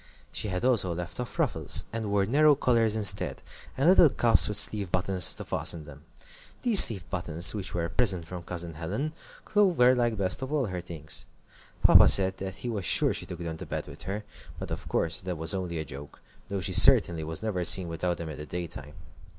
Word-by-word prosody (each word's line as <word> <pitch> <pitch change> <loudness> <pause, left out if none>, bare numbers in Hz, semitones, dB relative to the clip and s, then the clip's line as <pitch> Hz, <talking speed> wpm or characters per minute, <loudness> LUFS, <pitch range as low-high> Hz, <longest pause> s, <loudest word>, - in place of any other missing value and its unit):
She - - -2
had 90 +3 -3
also 100 -9 +1
left 85 +4 -7
off 125 - -6
ruffles, - - +1
and 115 -1 -4
wore 100 -1 0
narrow 145 +6 +3
collars 115 -5 +1
instead, 100 -3 0 0.3
and 135 +4 +1
little 175 -3 +6
cuffs 120 -3 +3
with 105 - +2
sleeve 100 -3 +2
buttons 90 -1 +1
to - - -9
fasten 80 -2 -1
them. 75 0 -14 0.6
These 230 -5 +9
sleeve 95 -7 -8
buttons, 85 -2 0
which 100 -3 -6
were 85 -1 -2
a - - -5
present 95 -6 0
from 90 +1 -8
Cousin 85 -1 -7
Helen, 105 - -5 0.3
Clover 180 -12 +3
liked 120 -3 -1
best 95 +4 -2
of 130 +1 -6
all 150 -4 0
her 90 -4 -5
things. 80 -3 -3 0.6
Papa - - +7
said 95 -1 +3
that 95 +3 -8
he - - -2
was 110 -5 -4
sure - - +1
she - - -5
took 90 - -8
them 80 -1 -6
to - - -9
bed - - -5
with - - -13
her, 105 +2 -4 0.3
but - - -8
of - - -7
course 80 0 -1
that 90 -2 -5
was 80 +4 0
only 90 -3 -4
a 80 - -4
joke, 70 +1 -11 0.3
though 100 -1 -4
she 95 0 -3
certainly 85 -1 +5
was 80 0 -6
never 100 -5 -2
seen 90 +1 +4
without 85 +2 -3
them 85 -2 -7
in 75 - -8
the 75 - -7
daytime. 80 -4 -8
95 Hz, 215 wpm, -27 LUFS, 85-110 Hz, 0.6 s, These